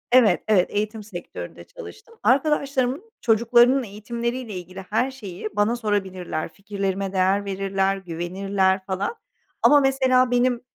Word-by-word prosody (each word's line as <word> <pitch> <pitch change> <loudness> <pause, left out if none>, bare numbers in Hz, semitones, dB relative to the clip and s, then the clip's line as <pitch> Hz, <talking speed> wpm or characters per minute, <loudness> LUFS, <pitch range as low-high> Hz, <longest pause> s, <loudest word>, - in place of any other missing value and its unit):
Evet, 245 -4 +5
evet, 195 -4 +3
eğitim 215 +1 -2
sektöründe 190 -4 -8
çalıştım. 460 -2 -13
Arkadaşlarımın 280 - +1
çocuklarının 240 +3 +4
eğitimleriyle 235 +2 -4
ilgili, 185 +1 -7
her 245 +5 +1
şeyi 210 -6 -7
bana 210 +3 +2
sorabilirler. 190 -8 -2
Fikirlerime 195 -1 -3
değer 190 +2 +2
verirler, 195 0 0
güvenirler 190 +2 -1
falan. 190 - -2 0.5
Ama 290 - +7
mesela, 260 -2 +3
benim 245 0 +2
210 Hz, 115 wpm, -23 LUFS, 195-255 Hz, 0.5 s, Ama